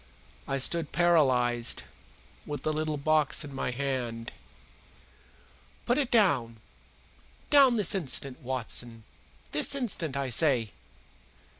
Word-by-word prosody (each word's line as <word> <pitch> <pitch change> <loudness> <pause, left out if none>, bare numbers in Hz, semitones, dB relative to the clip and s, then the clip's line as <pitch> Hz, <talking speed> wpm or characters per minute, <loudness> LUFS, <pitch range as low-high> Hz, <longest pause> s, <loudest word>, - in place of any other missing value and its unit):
I 135 - -1
stood 160 +3 +2
paralyzed, 130 -9 +2 0.6
with 145 -1 -6
the 155 - -1
little 155 0 -3
box 155 +1 +1
in 140 - -10
my 135 -1 -3
hand. 125 -3 -4 1.5
"Put 245 +4 +1
it 270 -4 -1
down! 130 - +1 0.9
Down, 275 -4 +6
this 210 -5 +2
instant, 140 -7 -1
Watson 120 -2 -4 0.5
this 150 - +1
instant, 180 - -2
I 135 -2 -3
say!" 120 -6 +4
140 Hz, 110 wpm, -28 LUFS, 125-170 Hz, 1.5 s, Down